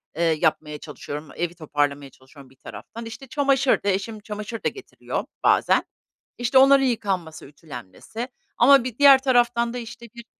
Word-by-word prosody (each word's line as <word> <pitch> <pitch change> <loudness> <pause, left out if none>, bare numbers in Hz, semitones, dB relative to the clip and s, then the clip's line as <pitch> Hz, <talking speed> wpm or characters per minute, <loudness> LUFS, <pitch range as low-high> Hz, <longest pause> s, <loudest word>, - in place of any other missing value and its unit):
eee, 170 - -1
yapmaya 155 -2 0
çalışıyorum. 150 0 -8
Evi 175 0 -3
toparlamaya 145 -3 -2
çalışıyorum 130 0 -17
bir 135 - -22
taraftan. 230 - -10
İşte, 230 +4 -9
çamaşır 275 -3 +1
da, 205 - 0
eşim 200 +3 -2
çamaşır 210 +1 -7
da - - +2
getiriyor 400 - -6 0.2
bazen. - - +3 0.5
İşte, 245 +2 +1
onların 270 +1 +6
yıkanması, 190 -10 -2
ütülenmesi 145 - -9 0.3
ama 270 0 +6
bir 245 -3 -6
diğer 280 -2 +8
taraftan 240 -2 +2
da, 245 - -4
işte, 235 0 -9
bir, 235 - -10
220 Hz, 155 wpm, -23 LUFS, 155-245 Hz, 0.5 s, diğer